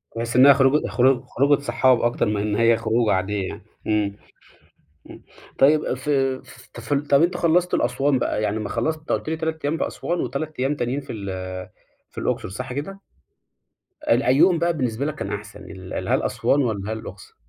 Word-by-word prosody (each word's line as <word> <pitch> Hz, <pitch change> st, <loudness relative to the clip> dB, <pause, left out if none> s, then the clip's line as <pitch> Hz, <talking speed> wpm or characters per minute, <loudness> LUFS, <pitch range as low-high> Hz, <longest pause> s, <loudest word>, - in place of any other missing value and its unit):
بحيث 115 Hz, +1 st, -3 dB
إن 130 Hz, +2 st, +7 dB
هي 140 Hz, -, +9 dB
خروجة 135 Hz, +2 st, +3 dB
خرو 130 Hz, 0 st, +2 dB
خروجة 140 Hz, +3 st, +2 dB
صحاب 130 Hz, -1 st, +2 dB
أكتر 120 Hz, 0 st, +1 dB
من 105 Hz, -2 st, -1 dB
إن 105 Hz, 0 st, -1 dB
هي 115 Hz, +1 st, +4 dB
خروجة 115 Hz, 0 st, +1 dB
عاديّة 95 Hz, +1 st, -1 dB
يعني. -, -, -8 dB, 0.2 s
امم، 105 Hz, -2 st, 0 dB, 0.9 s
امم -, -, -12 dB, 0.4 s
طيّب، 150 Hz, +3 st, +4 dB
في 135 Hz, 0 st, 0 dB, 0.4 s
فت 120 Hz, +5 st, -3 dB, 0.2 s
طب، 140 Hz, +1 st, +6 dB
أنتم 175 Hz, +1 st, 0 dB
خلصتوا 175 Hz, +2 st, +2 dB
الأسوان 140 Hz, -1 st, +1 dB
بقى -, -, -1 dB
يعني 105 Hz, 0 st, -1 dB
أما 105 Hz, -1 st, -4 dB
خلصت 155 Hz, +7 st, -1 dB
أنت 155 Hz, -, -7 dB
قُلت -, -, -1 dB
لي 160 Hz, -, -2 dB
3 160 Hz, 0 st, -3 dB
أيام 150 Hz, +3 st, 0 dB
في -, -, -1 dB
أسوان، 175 Hz, +1 st, -3 dB
و3 140 Hz, +5 st, -4 dB
أيام 135 Hz, +3 st, +1 dB
تانيين 130 Hz, +1 st, -2 dB
في 135 Hz, -, -8 dB
ال 100 Hz, -3 st, -6 dB, 0.8 s
في -, -, -26 dB
الأقصر، -, -, -2 dB
صح 125 Hz, +6 st, -6 dB
كده؟ 175 Hz, +9 st, -5 dB, 1.1 s
ال 120 Hz, +3 st, +3 dB
أيهم 165 Hz, +7 st, +4 dB
بقى 170 Hz, +1 st, +1 dB
بالنسبة 125 Hz, -1 st, -1 dB
لك 155 Hz, 0 st, -3 dB
كان -, -, -5 dB
أحسن؟ 105 Hz, 0 st, -8 dB
ال 95 Hz, -1 st, -6 dB
هل -, -, +2 dB
أسوان 145 Hz, -, +1 dB
والّا 110 Hz, -4 st, -2 dB
هل -, -, -5 dB
الأقصر؟ 100 Hz, -2 st, -11 dB
130 Hz, 190 wpm, -23 LUFS, 110-145 Hz, 1.1 s, هي